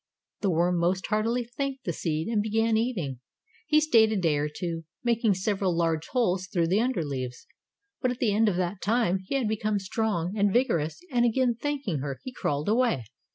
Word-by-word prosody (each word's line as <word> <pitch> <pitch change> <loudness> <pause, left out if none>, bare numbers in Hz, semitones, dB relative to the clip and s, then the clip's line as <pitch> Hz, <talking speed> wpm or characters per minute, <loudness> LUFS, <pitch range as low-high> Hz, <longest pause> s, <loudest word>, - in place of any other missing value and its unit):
The 200 - 0
worm 175 +1 +2
most 180 +2 +1
heartily 225 +3 0
thanked 265 +3 -4
the 170 - -2
seed 160 0 -2
and 220 -2 +1
began 220 +1 +1
eating. 195 - -1 0.5
He 305 -1 +5
stayed 230 -8 +4
a - - 0
day 165 -5 +2
or 150 +1 -1
two, 165 +1 -4 0.2
making 230 -4 +2
several 190 -2 0
large 165 -2 0
holes 190 -8 0
through 175 -4 0
the 195 +4 +3
under 240 -10 0
leaves, 130 -3 -5 0.6
but 255 - +2
at 245 - -3
the 230 -5 +1
end 220 +1 +4
of 190 - -1
that 180 +2 -2
time 210 -4 +2
he 275 - -2
had 260 -5 +1
become 215 -1 0
strong 195 -2 -1
and 205 -1 +2
vigorous, 210 - +1
and 240 -2 +3
again 240 +1 +2
thanking 270 - -2
her, 135 -1 -4
he 255 - -7
crawled 145 -7 -2
away. 225 - +2
205 Hz, 200 wpm, -27 LUFS, 170-235 Hz, 0.6 s, He